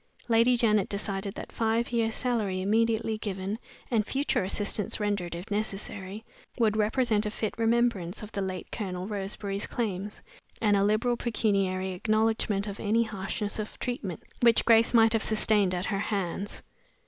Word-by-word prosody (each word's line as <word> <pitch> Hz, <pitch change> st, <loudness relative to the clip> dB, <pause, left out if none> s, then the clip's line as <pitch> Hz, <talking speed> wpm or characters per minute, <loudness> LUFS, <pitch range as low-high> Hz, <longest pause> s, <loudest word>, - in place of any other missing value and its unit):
Lady 235 Hz, +1 st, +4 dB
Janet 215 Hz, -4 st, +3 dB
decided 200 Hz, -1 st, -3 dB
that -, -, -7 dB
five 225 Hz, +1 st, 0 dB
years' 225 Hz, -2 st, +1 dB
salary 215 Hz, -7 st, 0 dB
immediately 220 Hz, +2 st, +1 dB
given, 200 Hz, 0 st, -3 dB, 0.3 s
and 225 Hz, -3 st, +3 dB
future 270 Hz, -1 st, 0 dB
assistance 205 Hz, +3 st, 0 dB
rendered 200 Hz, -5 st, -1 dB
if 175 Hz, +4 st, -8 dB
necessary, 205 Hz, 0 st, -3 dB, 0.3 s
would 220 Hz, -3 st, +2 dB
represent 215 Hz, 0 st, +2 dB
a -, -, 0 dB
fit 215 Hz, 0 st, -3 dB
remembrance 225 Hz, -6 st, +1 dB
of 210 Hz, -, -8 dB
the 200 Hz, -, -3 dB
late 185 Hz, -1 st, -4 dB
Colonel 185 Hz, -4 st, -4 dB
Roseberry's 200 Hz, 0 st, -3 dB
claims, 205 Hz, -3 st, -3 dB, 0.4 s
and 210 Hz, -2 st, +3 dB
a 195 Hz, -, +3 dB
liberal 220 Hz, +4 st, +2 dB
pecuniary 195 Hz, -5 st, 0 dB
acknowledgment 215 Hz, +1 st, +1 dB
of 200 Hz, -1 st, -6 dB
any 225 Hz, +2 st, +2 dB
harshness 205 Hz, 0 st, -3 dB
of 215 Hz, -, -5 dB
treatment 210 Hz, -, -4 dB, 0.2 s
which 235 Hz, -1 st, +5 dB
Grace 230 Hz, 0 st, +5 dB
might 225 Hz, -1 st, +6 dB
have 225 Hz, -, +2 dB
sustained 210 Hz, -4 st, +2 dB
at 180 Hz, +2 st, -2 dB
her 200 Hz, -2 st, -1 dB
hands. 200 Hz, -1 st, -3 dB
210 Hz, 155 wpm, -28 LUFS, 195-225 Hz, 0.4 s, might